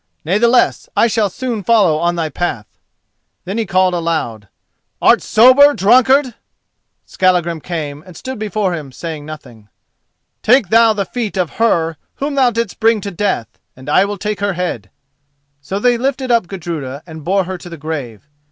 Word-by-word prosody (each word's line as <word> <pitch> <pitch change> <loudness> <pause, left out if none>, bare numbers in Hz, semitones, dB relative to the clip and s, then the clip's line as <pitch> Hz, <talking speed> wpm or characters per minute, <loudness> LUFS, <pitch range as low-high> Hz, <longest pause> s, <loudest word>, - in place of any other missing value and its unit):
Natheless, 230 +8 +2
I - - +5
shall 215 -2 +1
soon 235 +2 -4
follow 195 -7 +3
on 175 +1 0
thy 165 -2 -1
path." 140 -8 -3 0.8
Then 195 +5 -3
he 225 - -2
called 185 0 +2
aloud: 155 -12 -2 0.5
"Art - - +4
sober, 260 +6 +6
drunkard?" 255 +5 +4 0.7
Skallagrim 175 -3 0
came 150 -4 -5
and 180 -1 -14
stood 260 -3 -7
before 210 -3 -1
him, 150 -5 -6
saying 155 +1 -7
nothing. 120 -9 -11 0.7
"Take 240 -4 +3
thou 225 0 +5
the 200 -2 -2
feet 225 -4 -4
of 175 -5 -2
her 165 -8 +1 0.2
whom 285 +1 -3
thou 265 -3 +3
didst 230 -3 -3
bring 225 0 +3
to 200 - -5
death, 185 - -3 0.2
and 130 +2 -14
I 185 +6 +4
will 205 0 -4
take 210 0 -3
her 205 -1 -1
head." 175 - -4 0.7
So 165 +8 -4
they 240 +3 +2
lifted 265 0 -1
up 230 -6 +2
Gudruda 160 -7 -6
and 160 -3 -10
bore 195 +3 +1
her 185 0 -6
to 175 - -10
the 170 - -8
grave. 140 -7 -6
185 Hz, 170 wpm, -16 LUFS, 160-225 Hz, 0.8 s, sober